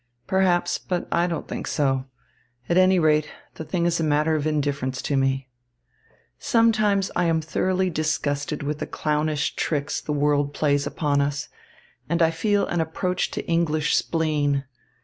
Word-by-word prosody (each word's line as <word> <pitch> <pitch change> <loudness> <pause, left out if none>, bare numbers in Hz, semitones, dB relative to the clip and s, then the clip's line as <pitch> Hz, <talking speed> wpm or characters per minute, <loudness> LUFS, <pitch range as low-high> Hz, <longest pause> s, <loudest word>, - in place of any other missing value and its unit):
Perhaps, 185 +1 +1
but 180 -2 -3
I 170 +1 +2
don't 170 -2 -4
think - - -5
so. 135 -3 0 0.6
At 170 - +1
any 185 +1 +5
rate, 155 -2 +3 0.2
the - - -7
thing 170 +1 -1
is 170 -1 +1
a - - 0
matter 155 +1 +2
of 155 -1 0
indifference 140 -4 -1
to 145 - -1
me. 135 0 0 0.9
Sometimes 215 -4 +2
I 175 - +2
am 165 -1 +2
thoroughly 185 +3 0
disgusted 150 -2 -1
with 150 +1 -3
the - - -4
clownish 150 -1 -1
tricks 145 -2 -1
the - - -5
world 145 -1 +1
plays 145 -2 +1
upon 145 -2 0
us, 145 +1 -2 0.6
and 170 +1 +2
I 165 - +4
feel 205 +5 +1
an 175 - -1
approach 180 +3 -1
to - - -5
English 160 -2 +1
spleen. 150 -4 0
155 Hz, 160 wpm, -24 LUFS, 145-175 Hz, 0.9 s, any